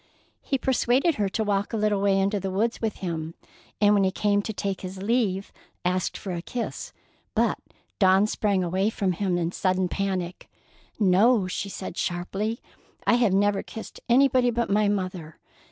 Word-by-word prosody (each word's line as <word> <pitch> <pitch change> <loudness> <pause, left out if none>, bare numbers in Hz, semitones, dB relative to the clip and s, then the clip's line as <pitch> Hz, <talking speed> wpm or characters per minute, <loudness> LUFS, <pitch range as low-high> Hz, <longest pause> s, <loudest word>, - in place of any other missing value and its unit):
He 275 - -1
persuaded 265 +4 +2
her 200 - +1
to 220 +3 -1
walk 205 +1 -1
a - - 0
little 210 -2 +1
way 195 -1 +3
into 200 +1 +1
the 195 0 -3
woods 215 +5 -1
with 220 -2 -1
him; 165 -1 -4 0.4
and 205 0 +5
when 200 -1 +4
he 190 - +3
came 205 +1 +1
to 220 - -4
take 200 -2 -3
his 185 0 -7
leave 205 -4 0 0.3
asked 180 0 0
for 195 - -6
a 170 -1 -3
kiss, 235 +6 -5 0.4
but - - +2 0.4
Dawn 190 0 +5
sprang 205 -3 0
away 190 +4 +1
from 200 -4 -1
him 180 0 -1
in 170 -1 -1
sudden 185 0 0
panic: 185 -2 -3 0.5
"No," 205 +2 +4
she 190 +2 -3
said 190 -2 -7
sharply; 195 +6 -2 0.4
"I - - +4
have 235 -4 +3
never 200 0 +2
kissed 225 - -9
anybody 255 0 +4
but 235 -2 -1
my 210 +1 +3
mother." 185 -5 -3
200 Hz, 175 wpm, -26 LUFS, 185-220 Hz, 0.5 s, and